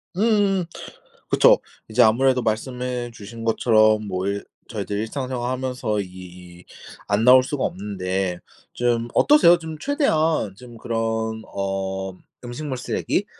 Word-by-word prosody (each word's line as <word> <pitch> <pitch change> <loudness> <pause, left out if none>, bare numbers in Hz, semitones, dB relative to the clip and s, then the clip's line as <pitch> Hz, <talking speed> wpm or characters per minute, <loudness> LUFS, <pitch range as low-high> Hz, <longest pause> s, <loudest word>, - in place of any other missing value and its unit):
음음. 200 -3 +2 0.6
그쵸. - - +6 0.3
이제 110 +3 +3
아무래도 125 +3 +3
말씀해 125 +2 -3
주신 115 +1 -10
것처럼 110 -2 +3
뭐 95 0 -2
일 100 0 -2 0.3
저희들 100 - -4
일상생활 125 +2 -3
하면서 125 -4 -2
이 90 -1 -11 0.4
안 105 +2 +1
나올 130 +1 +8
수가 140 +1 -3
없는데 95 -2 -3 0.3
좀 120 -1 0
어떠세요? 230 - +6
좀 160 -2 -7
최대한 160 - +1
좀 120 +1 -13
그런 110 -1 -2
어 95 -1 -3 0.3
음식물 130 +2 -5
쓰레기 125 - -1
115 Hz, 260 characters per minute, -22 LUFS, 100-130 Hz, 0.6 s, 나올